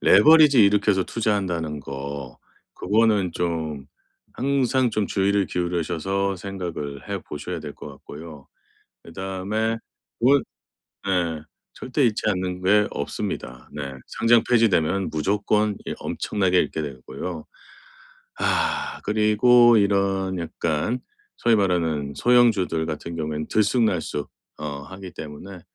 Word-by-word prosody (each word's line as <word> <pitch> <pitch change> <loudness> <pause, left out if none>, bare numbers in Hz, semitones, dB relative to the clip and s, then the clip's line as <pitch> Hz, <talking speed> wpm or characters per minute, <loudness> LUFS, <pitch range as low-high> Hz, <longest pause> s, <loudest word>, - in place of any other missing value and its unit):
레버리지 150 -6 +7
일으켜서 100 -1 +3
투자한다는 90 -9 -1
거 70 -1 -7 0.4
그거는 105 -4 +2
좀 80 -5 -3 0.5
항상 130 -2 +1
좀 105 -2 0
주의를 100 0 +1
기울이셔서 90 +3 -1
생각을 90 -7 -6
해 - - -2
보셔야 80 +3 -6
될 75 -1 -7
것 - - -9
같고요. 75 +1 -11 0.5
그다음에 95 +5 -3 0.4
올 135 +4 +5 0.6
네 85 -5 0 0.3
절대 130 +3 -2
잃지 110 -3 +1
않는 90 -2 -1
게 105 +2 +4
없습니다. 65 -3 -5
네 70 -2 -5 0.2
상장 115 0 +3
폐지되면 100 -6 +2
무조건 105 +6 +1
이 - - -3
엄청나게 95 -3 0
잃게 80 - 0
되고요. 70 +4 -6 0.9
아 470 0 0
그리고 115 +3 +5
이런 100 -2 +1
약간 85 +6 -2 0.4
소위 115 -1 +3
말하는 80 -7 0
소형주들 110 - +3
같은 80 +2 -5
경우엔 75 -1 -3
들쑥날쑥 105 - +1 0.3
어 70 -2 -5
하기 95 +4 -10
때문에 80 +6 -9
95 Hz, 255 characters per minute, -23 LUFS, 80-110 Hz, 0.9 s, 레버리지